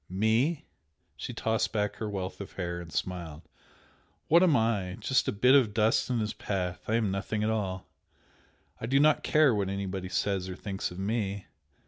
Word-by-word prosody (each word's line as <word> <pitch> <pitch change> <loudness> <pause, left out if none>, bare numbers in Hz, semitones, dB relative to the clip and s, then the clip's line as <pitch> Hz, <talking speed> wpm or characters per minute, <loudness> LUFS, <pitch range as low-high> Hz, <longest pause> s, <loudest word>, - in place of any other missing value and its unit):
"Me?" 110 - +1 0.5
She - - -6
tossed 110 0 0
back 105 -1 -1
her 110 - -3
wealth 95 -1 -4
of 100 - -8
hair, 85 -2 -4
and 85 -1 -10
smiled 85 -4 -4 0.9
"What 170 +3 +6
am 175 -5 +5
I? 105 -5 0
Just 130 - +1
a - - +2
bit 125 +6 +4
of 120 -7 +4
dust 110 +3 +2
in 125 - +1
his 105 -2 -1
path! 90 -3 -3
I 110 - +1
am 110 -4 +1
nothing 105 +2 -2
at 110 - +1
all! 95 -4 -3 0.9
I 115 - -4
do 135 +3 +3
not 150 +1 +4
care 150 -5 +4
what 100 -2 0
anybody 95 -1 -4
says 95 -1 -1
or 90 - -5
thinks 95 0 -4
of 90 - -10
ME! 100 -1 -2
105 Hz, 185 wpm, -29 LUFS, 95-115 Hz, 0.9 s, What